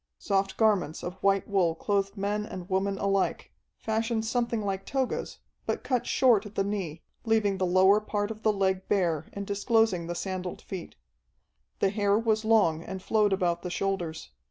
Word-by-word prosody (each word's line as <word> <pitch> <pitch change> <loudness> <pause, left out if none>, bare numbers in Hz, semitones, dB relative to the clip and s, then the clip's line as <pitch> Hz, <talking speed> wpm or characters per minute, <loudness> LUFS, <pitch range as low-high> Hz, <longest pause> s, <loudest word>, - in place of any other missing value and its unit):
Soft 195 - -1
garments 200 -8 +2
of 180 +2 -6
white 195 0 +2
wool 185 -5 +2
clothed 200 +2 -1
men 205 +2 -1
and 185 -4 -7
women 195 +1 0
alike, 195 -1 0 0.3
fashioned 225 0 -1
something 235 -1 -1
like 195 -1 -2
togas, 265 +1 -2 0.3
but - - -1
cut 250 -3 0
short 240 -6 +4
at 205 - -14
the 195 - +2
knee, 190 -6 -4 0.2
leaving 215 -4 +1
the 185 - +1
lower 190 +3 +5
part 205 0 -2
of 220 0 -8
the 220 - +3
leg 190 -2 0
bare 170 -6 +1
and 200 0 -5
disclosing 205 -3 +1
the 175 - -3
sandaled 185 -1 -4
feet. 185 -3 -7 0.9
The 195 - +3
hair 205 -1 +2
was 220 -1 +1
long 210 -8 +3
and 190 +1 -6
flowed 210 +1 +2
about 175 -3 +1
the 180 - -4
shoulders. 175 -4 -3
195 Hz, 175 wpm, -28 LUFS, 185-215 Hz, 0.9 s, lower